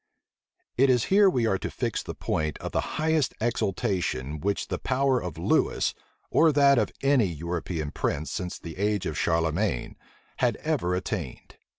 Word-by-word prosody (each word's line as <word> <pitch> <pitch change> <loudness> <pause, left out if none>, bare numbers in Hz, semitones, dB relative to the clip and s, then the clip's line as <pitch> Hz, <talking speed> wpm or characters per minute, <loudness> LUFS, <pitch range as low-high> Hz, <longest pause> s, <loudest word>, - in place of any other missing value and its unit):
It 135 +2 +5
is 125 -3 +4
here 200 0 +7
we 125 -9 +1
are 95 -4 +1
to - - -4
fix - - -2
the - - -7
point 75 -2 -2
of - - -6
the - - -2
highest 155 -3 +1
exaltation 95 - -1
which 100 +5 -1
the - - -2
power 130 -1 +1
of 90 -3 -6
Lewis, 85 - +1 0.4
or 160 0 +5
that 140 -2 +5
of - - 0
any 135 -6 +4
European 85 -1 -4
prince 75 +2 -2
since 90 -3 -4
the 85 0 -9
age 105 0 0
of 80 - -3
Charlemagne, 80 - 0 0.4
had - - +2
ever 90 +1 -1
attained. 90 - -5
95 Hz, 165 wpm, -27 LUFS, 80-130 Hz, 0.4 s, here